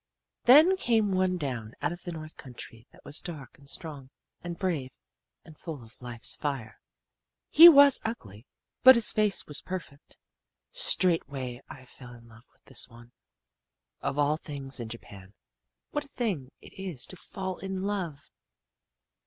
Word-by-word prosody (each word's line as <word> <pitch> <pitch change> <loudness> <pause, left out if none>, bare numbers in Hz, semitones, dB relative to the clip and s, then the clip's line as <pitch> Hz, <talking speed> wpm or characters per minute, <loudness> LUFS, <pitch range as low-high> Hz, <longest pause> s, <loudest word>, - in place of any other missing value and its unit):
"Then 310 +10 +7
came 225 - +1
one 185 -1 +1
down 125 -8 -4
out 145 - -1
of 175 0 -8
the 175 - -4
north 155 -1 -9
country 120 -2 -11
that - - -21
was 145 - -6
dark 145 -9 -9
and 140 -1 -15
strong 140 -4 -7 0.3
and 170 -1 -5
brave 160 -9 -3 0.5
and 160 - -14
full 150 -5 -8
of 115 +3 -19
life's 120 -1 -2
fire. 135 -7 -4 0.7
"He 335 +2 +11
was 285 -3 +7
ugly, 110 - -7 0.3
but 260 0 +10
his 235 -2 +4
face 210 -2 0
was 150 - -6
perfect. 175 -6 -8 0.5
"Straightway 140 - +2
I 130 - -11
fell 125 -1 -13
in 115 0 -16
love 115 +2 -18
with - - -37
this - - -5
one. 115 +1 -16 0.9
Of 140 - -2
all 145 +1 +2
things 140 -4 -6
in 115 -2 -6
Japan, 100 -4 -11 0.6
what 295 0 -3
a - - -17
thing 200 - -3
it - - -15
is 185 -9 -7
to - - -11
fall 185 +1 -6
in 190 0 -4
love! 180 -9 -4
150 Hz, 160 wpm, -28 LUFS, 125-190 Hz, 0.9 s, He